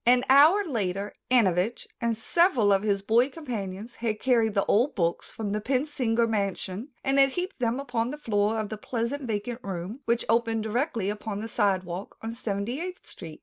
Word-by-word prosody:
An 245 +1 +4
hour 305 +10 +7
later 200 - -2 0.2
Antovich 215 -3 +2 0.2
and 230 -1 0
several 250 - +3
of 195 - +2
his 200 -2 0
boy 235 +6 +3
companions 230 - -6
had 220 -2 -2
carried 230 -4 +2
the 200 - +2
old 240 +8 +2
books 170 -3 -1
from 210 -2 -4
the 210 +1 -1
Pensinger 250 -2 +1
mansion 200 +1 -2 0.2
and 275 +1 +2
had 275 0 +6
heaped 365 0 -4
them 240 +1 0
upon 245 -4 -1
the 295 - -5
floor 215 -5 0
of 215 -1 -3
the 215 - -5
pleasant 235 +5 -3
vacant 225 +2 -3
room, 195 +5 -5
which 235 0 +1
opened 225 -1 +1
directly 225 - -1
upon 210 -1 -5
the 220 - -4
sidewalk 190 -4 -1
on 225 +1 -4
Seventy 230 +4 -3
eighth 365 +1 -6
Street. 160 -4 -10
225 Hz, 185 wpm, -27 LUFS, 205-250 Hz, 0.2 s, hour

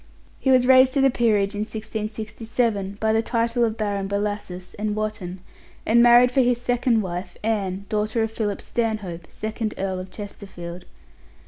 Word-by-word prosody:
He 265 - 0
was 255 -1 +5
raised 260 +1 +6
to 275 - +3
the 270 0 +5
peerage 210 -4 +2
in 205 - -4
1667 215 -1 -3
by 220 0 +2
the 225 - +3
title 235 +1 0
of 225 -1 0
Baron 200 -2 -1
Bellasis 200 -3 -3
and 210 0 -1
Wotton, 210 -4 -4 0.4
and 235 +2 +5
married 240 +1 +7
for 265 - +3
his 245 -1 +2
second 245 -2 +1
wife 180 0 -5
Anne, 200 -3 -1
daughter 215 +1 0
of 220 - -2
Philip 210 -3 -2
Stanhope, 210 -8 -3
second 220 0 -4
Earl 190 -1 -2
of 185 0 -7
Chesterfield. 185 -4 -8
215 Hz, 160 wpm, -23 LUFS, 200-235 Hz, 0.4 s, married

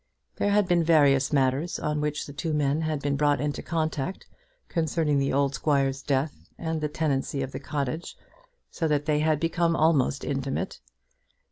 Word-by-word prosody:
There 205 - +1
had 205 -1 +3
been 175 -2 +3
various 140 -5 +4
matters 140 +3 +1
on 150 0 -1
which 150 0 -2
the 145 - -9
two 160 +2 -3
men 145 +1 +1
had 155 -3 -2
been 145 -1 +1
brought 145 0 +2
into 145 0 -2
contact 160 +1 -2 0.4
concerning 160 -3 0
the 135 0 +1
old 140 0 +1
squire's 135 -1 +1
death 140 +2 -2
and 160 -1 -3
the 150 - -1
tenancy 140 -3 -1
of 130 - -5
the - - -5
cottage, 145 +2 -4 0.5
so 165 - -1
that 145 -1 +1
they 150 -1 +2
had 155 -1 +2
become 165 +1 +1
almost 150 -4 +2
intimate. 135 -1 -3
150 Hz, 170 wpm, -26 LUFS, 140-160 Hz, 0.5 s, various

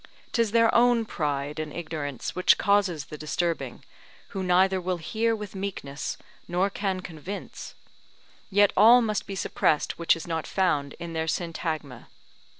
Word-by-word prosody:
'Tis 230 -2 +2
their 230 +1 +4
own 240 -1 +4
pride 145 -5 -2
and 155 -1 -4
ignorance 150 -5 -5
which 180 - +4
causes 195 -7 +2
the 150 - -9
disturbing, 165 +2 -2 0.4
who 195 - -4
neither 185 +1 +3
will 180 0 -1
hear 225 +7 0
with 210 -2 -7
meekness, 185 -8 -5 0.3
nor 185 +3 +1
can 195 -2 -2
convince; 180 +3 -8 0.7
yet 205 0 +4
all 240 +3 +7
must 215 -2 -2
be 195 - -5
suppressed 155 -4 0
which 170 - +4
is 165 - -7
not 165 -2 -3
found 145 -7 0
in 170 -1 -7
their 160 0 -2
Syntagma. 160 -6 -3
180 Hz, 150 wpm, -26 LUFS, 155-200 Hz, 0.7 s, all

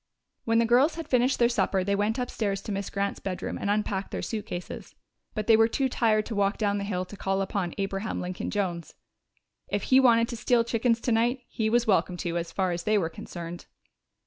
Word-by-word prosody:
When 225 0 +2
the 230 - +4
girls 255 +7 +4
had 330 -1 -6
finished 250 +1 +2
their 235 - +4
supper 195 -5 +1
they 200 +2 0
went 205 +4 0
upstairs 210 -5 -2
to - - -5
Miss 200 -1 -3
Grant's 200 0 -2
bedroom 185 -2 -4
and 200 - -2
unpacked 205 -2 -1
their - - -4
suitcases. 205 -5 -6 0.4
But 215 -1 -2
they 225 - +6
were 225 0 +5
too 265 +3 0
tired 215 -3 +2
to 230 - -5
walk 200 0 +1
down 205 -2 0
the - - -3
hill 185 -2 -2
to 195 - -11
call 195 -1 -1
upon 190 -2 -2
Abraham 195 +2 -2
Lincoln 180 0 -4
Jones. 180 -5 -3 0.7
If - - -2
he 260 -1 +5
wanted 235 -3 +5
to 235 - -5
steal 240 0 +3
chickens 230 0 +1
tonight, 240 +2 +1
he 220 -1 -1
was 240 +1 +3
welcome 180 -4 +2
to, 170 -1 -3
as 170 - -5
far 190 -2 0
as 170 0 -2
they 215 +2 +2
were 170 -5 0
concerned. 170 +1 -8
210 Hz, 215 wpm, -27 LUFS, 195-230 Hz, 0.7 s, they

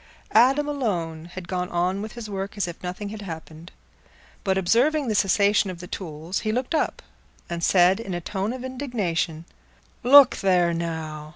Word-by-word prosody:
Adam 270 +6 +5
alone 175 - -2
had 175 0 -9
gone 180 0 -2
on 180 +3 0
with 215 0 -6
his 235 -2 -7
work 195 0 -5
as 200 - 0
if 170 - -8
nothing 185 +3 -5
had 215 0 -7
happened. 165 -2 -9 0.7
But 190 -1 +1
observing 250 - +2
the - - +1
cessation 200 0 +3
of 180 -2 -7
the 180 - -8
tools, 170 -1 -5
he 215 - -2
looked 250 +5 -2
up, 315 - -1 0.4
and 170 -1 -4
said, 180 +2 +4
in 195 -6 -5
a - - -2
tone 195 +4 -3
of 255 0 -6
indignation, 205 - -2 0.6
"Look 275 +1 +7
there, 180 -3 +2
now! 160 -2 -4
190 Hz, 175 wpm, -24 LUFS, 170-225 Hz, 0.7 s, Look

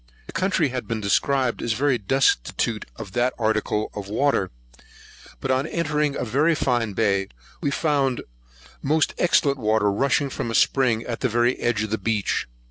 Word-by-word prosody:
The - - -11
country 170 -3 +1
had 125 0 -5
been 115 -1 -2
described 125 +5 +1
as 115 - 0
very 130 +1 +1
destitute 125 - 0
of 95 - -8
the 120 +4 +1
article 110 -1 0
of 100 -1 -7
water; 110 -4 +1 0.9
but 135 - -2
on 130 +3 +1
entering 150 -4 0
a - - -2
very 145 +8 +2
fine 120 -7 0
bay, 100 -2 +1 0.3
we - - 0
found 140 -4 0 0.6
most 155 +3 +1
excellent 140 -5 +3
water 110 -2 +2
rushing 140 +5 +1
from 115 - -3
a 115 - -2
spring 120 -4 +2
at 120 -1 -5
the 130 - 0
very 120 +2 +2
edge 110 -3 0
of 110 - -5
the 110 - -1
beach. 105 - -1
120 Hz, 170 wpm, -23 LUFS, 110-140 Hz, 0.9 s, excellent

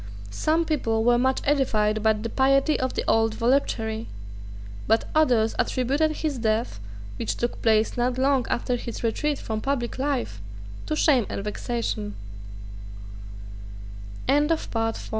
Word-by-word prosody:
Some 315 - +1
people 225 -8 0
were 240 +1 +4
much 260 +1 +1
edified 215 -7 +1
by 220 0 +4
the 215 +2 -4
piety 275 +4 +2
of 260 0 -2
the - - -1
old 225 -1 +2
voluptuary: 230 -3 0 0.8
but 225 +1 +2
others 245 -8 +3
attributed 275 +5 +1
his 305 -3 -3
death, 220 - -1 0.4
which - - -2
took 240 - -3
place 220 -1 +2
not 245 +1 0
long 265 -1 +2
after 245 +1 0
his 235 -1 -7
retreat 290 +6 0
from 220 -1 -4
public 260 -2 -2
life, 110 - -2 0.5
to 310 - -1
shame 270 -8 +3
and 195 - -4
vexation, 210 - -3 2.1
The 295 +4 +3 0.2
Count 225 -1 -2
240 Hz, 135 wpm, -25 LUFS, 220-275 Hz, 2.1 s, were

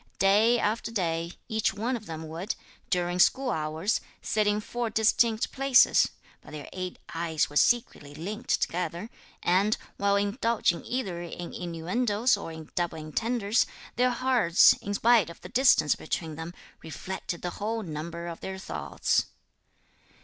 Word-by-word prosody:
Day 210 +5 +4
after 220 0 -1
day, 170 -5 -2
each 220 -3 0
one 235 +5 -1
of 220 -3 -8
them 160 -1 -6
would, 170 +7 -4 0.3
during 175 -1 0
school 260 +7 +4
hours, 160 +4 -1 0.2
sit 215 -1 0
in 210 0 +2
four 235 +2 -3
distinct 220 +1 +2
places: 270 -1 +5 0.3
but - - -15
their 150 -2 -7
eight 185 -1 -5 0.2
eyes 165 -3 -1
were - - -11
secretly 150 - +1
linked 210 +10 -2
together; 175 +4 -3 0.3
and, 195 +5 +3 0.2
while 200 0 +2
indulging 205 -3 +1
either 200 -9 -3
in 175 0 -7
innuendoes 205 +8 0
or 200 -5 -7
in 160 -1 -10
double 175 -2 -1
entendres, 210 +8 0 0.3
their 250 +1 +3
hearts, 245 -8 +5
in 205 0 -3
spite 230 -4 +4
of 170 - -11
the - - -9
distance 245 - +4
between 160 0 -4
them, 165 +3 -7 0.3
reflected 170 +2 -6
the 175 - -2
whole 225 +1 -1
number 170 +1 -6
of 170 -1 -6
their 190 0 -6
thoughts. 190 - -1
195 Hz, 150 wpm, -28 LUFS, 170-225 Hz, 0.3 s, places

